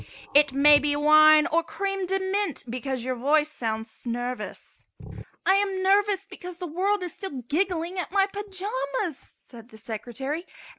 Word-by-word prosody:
"It 290 -1 +5
may 290 +2 +6
be 290 0 0
wine 305 +1 +6
or 335 0 +2
cream 390 +1 -3
de 385 +1 0
mint 385 -4 -2
because 255 +1 -4
your 255 +1 -1
voice 295 +5 +2
sounds 225 -3 -4
nervous." 245 +1 -5 0.6
"I 380 - +5
am 390 -2 -1
nervous 400 0 +2
because 360 -3 -9
the 360 - -5
world 375 +4 0
is 355 - -5
still 285 - -7
giggling 355 +3 -1
at 360 - -4
my 390 0 +3
pajamas," 380 -8 -4
said 235 -1 -16
the 220 - -14
Secretary. 245 - -5
310 Hz, 155 wpm, -26 LUFS, 265-380 Hz, 0.6 s, may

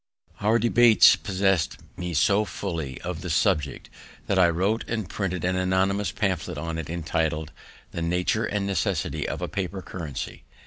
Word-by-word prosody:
Our 110 +3 +3
debates 120 0 +6
possess'd 95 -4 0 0.2
me 90 -1 -4
so 100 +7 +4
fully 80 -11 -4
of 90 -2 -5
the 90 - -5
subject, 75 -4 0 0.3
that 95 - +1
I 90 -2 +6
wrote 95 +7 0
and 110 -4 -2
printed 90 -3 -3
an 90 0 +1
anonymous 95 +2 +1
pamphlet 95 -7 -2
on 80 +2 -3
it, 80 - -6
entitled 80 -2 -1 0.4
"The 85 - -4
Nature 90 +6 0
and 100 -1 -1
Necessity 100 -3 -1
of - - -4
a - - -1
Paper 95 -1 -4
Currency." 80 -8 -6
90 Hz, 155 wpm, -25 LUFS, 85-100 Hz, 0.4 s, debates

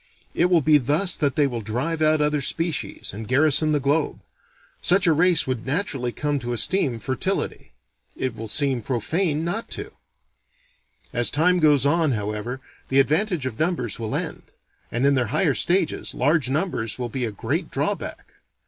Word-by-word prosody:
It 175 - +2
will 180 -2 +3
be 150 +1 +5
thus 150 +8 +2
that 145 -4 0
they 145 - +3
will 120 -4 -3
drive 130 +10 -3
out 155 0 +3
other 150 -1 +1
species, 165 - -2
and 110 +2 -7
garrison 155 +3 +4
the 150 - +2
globe. 145 +3 0 0.6
Such 195 +2 +3
a 165 - +4
race 170 +1 +4
would 130 -3 -3
naturally 135 -4 -1
come 145 +2 -2
to 120 -1 -4
esteem 125 - +1
fertility. 130 +1 -3 0.4
It 130 -2 -3
will 115 0 -7
seem 135 +1 +1
profane 150 - -1
not 205 +7 -3
to. - - -7 1.2
As 120 0 +3
time 180 +4 +2
goes 150 -4 +4
on, 160 -1 +2
however, 105 +4 -4 0.3
the 135 - +3
advantage 160 +2 +1
of 120 -4 -5
numbers 160 - -1
will 110 -2 -3
end; - - -4 0.5
and 120 +3 0
in 140 - +4
their 125 -3 +1
higher 150 - +1
stages, 170 - 0
large 150 -4 +2
numbers 135 - -2
will 125 -1 -3
be 130 +2 -4
a 110 - -3
great 100 - -3
drawback. - - -3
145 Hz, 170 wpm, -23 LUFS, 125-160 Hz, 1.2 s, be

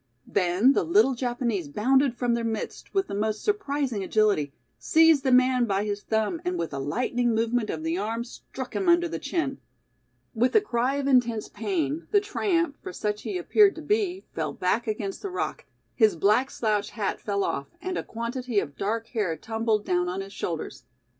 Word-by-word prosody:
Then 195 +7 +3
the - - +2
little 210 +11 +4
Japanese 240 - -2
bounded 255 - +2
from 245 -1 +1
their 235 0 -1
midst 225 -1 -4
with 390 0 +1
the - - -7
most 215 +1 -1
surprising 285 - -1
agility, 200 -8 +2 0.3
seized 320 -3 +5
the 265 - +2
man 255 -1 +4
by 200 -1 0
his 205 -1 -3
thumb 220 +11 -1
and 360 0 -1
with 165 - -3
a 140 - -3
lightning 240 - 0
movement 230 0 0
of 155 - -4
the 165 +3 -1
arm 225 +3 -2
struck 255 +1 -9
him 380 -3 +1
under 345 0 +4
the 335 - -4
chin. 275 -6 -2 0.7
With 245 +2 +1
a - - +9
cry 260 - 0
of 280 -1 -2
intense 245 -5 +2
pain, 330 -4 -2
the 410 - +5
tramp, 350 -6 0
for 375 - -6
such 210 -10 -3
he 385 - -3
appeared 400 +3 +4
to 320 - -8
be, 390 0 0
fell - - -2
back 215 +6 0
against 210 -2 -3
the 400 - -4
rock, 370 - -3 0.3
his 220 -5 +4
black 215 - +3
slouch 210 -3 -1
hat 210 -4 -3
fell 200 -1 -1
off, 140 - -2
and 370 0 -4
a - - -1
quantity 235 0 -2
of 140 -6 -5
dark 225 +3 -1
hair 200 -9 -1
tumbled 220 +2 -1
down 180 0 +1
on 185 +2 -3
his 195 +1 -9
shoulders. 155 - -5
235 Hz, 195 wpm, -26 LUFS, 205-280 Hz, 0.7 s, a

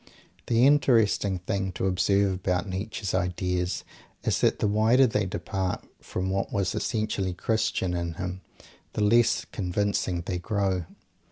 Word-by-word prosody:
The 120 +1 +4
interesting 115 -9 +3
thing 95 +1 -2
to 90 - -2
observe 100 +1 +2
about 90 0 -1
Nietzsche's 100 +1 -4
ideas 90 0 -1 0.4
is - - 0
that - - +3
the - - +1
wider 110 +6 +4
they 105 -5 0
depart 95 0 -3
from 95 +1 -3
what 100 0 -1
was 100 -1 0
essentially 105 -5 -1
Christian 95 -3 0
in 85 -1 -2
him, 95 +1 -5 0.5
the 105 - 0
less 115 +3 +3
convincing 95 -2 -1
they 90 -2 -2
grow. 95 -2 -1
95 Hz, 140 wpm, -27 LUFS, 90-105 Hz, 0.5 s, The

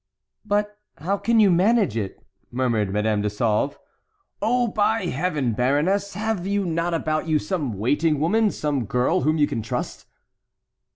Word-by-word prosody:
"But 210 0 -1 0.2
how 195 +6 -1
can 230 -1 +2
you 205 -3 +6
manage 195 - +3
it?" 100 -4 -5 0.2
murmured 120 -5 0
Madame 105 +1 0
de 105 - 0
Sauve. 110 +5 0 0.6
"Oh! 240 +3 +2
by 215 0 +1
Heaven! 150 -6 -1
baroness, 150 - 0
have 210 -3 -2
you 200 0 0
not 170 0 -1
about 155 0 -1
you 155 -1 +3
some 150 - -2
waiting 145 +8 +1
woman, 210 +8 +2
some 145 - -2
girl 125 - +1
whom 155 +1 +1
you 150 - +4
can 115 - -3
trust?" 110 - -5
160 Hz, 155 wpm, -23 LUFS, 125-200 Hz, 0.6 s, you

